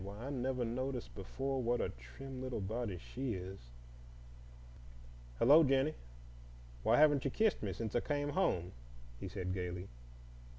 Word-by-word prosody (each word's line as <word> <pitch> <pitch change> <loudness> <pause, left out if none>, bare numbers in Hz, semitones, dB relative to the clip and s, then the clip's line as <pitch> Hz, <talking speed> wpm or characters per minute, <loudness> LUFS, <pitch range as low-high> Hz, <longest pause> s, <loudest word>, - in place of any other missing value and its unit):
Why, 100 +1 -7
I 125 +5 -5
never 130 -2 -1
noticed 125 +2 -3
before 135 +7 -2
what 120 0 +1
a - - 0
trim 130 - -9
little 130 -3 -3
body 105 0 -2
she 125 +5 -4
is. 95 +1 -6 1.8
Hello, 145 - +8
Jennie! 135 +2 +3 0.9
Why, - - +4
you - - +5
haven't 145 -3 +4
kissed 220 -2 +3
me 100 - -1
since 110 +3 -4
I - - +5
came 145 +2 -1
home," 90 - +1 0.5
he - - -5
said 90 -1 -3
gaily. 90 0 -4
120 Hz, 145 wpm, -36 LUFS, 95-135 Hz, 1.8 s, Hello